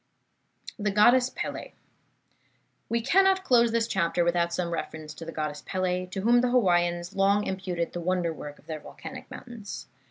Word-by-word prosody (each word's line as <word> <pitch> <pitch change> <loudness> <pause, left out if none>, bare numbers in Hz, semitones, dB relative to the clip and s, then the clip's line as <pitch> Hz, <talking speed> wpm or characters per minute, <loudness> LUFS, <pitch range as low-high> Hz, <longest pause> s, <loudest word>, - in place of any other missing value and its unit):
THE 210 0 0
GODDESS 240 +5 +5
PELE - - -5 1.2
We 235 0 +1
cannot 380 +7 +4
close 235 -6 +4
this 230 0 +2
chapter 175 -4 +1
without 170 0 +1
some 170 0 -2
reference 155 -2 -5
to 165 - -9
the 165 - -6
Goddess 150 -2 -4
Pele, 185 -1 -1
to 190 +1 -5
whom 240 +3 +5
the 250 - +1
Hawaiians 175 -6 +2
long 200 +1 +3
imputed 185 -3 -3
the 175 - -4
wonder 175 -1 0
work 145 -1 -8
of - - -22
their 155 -1 -5
volcanic - - -10
mountains. 235 -5 -8
185 Hz, 165 wpm, -27 LUFS, 170-230 Hz, 1.2 s, GODDESS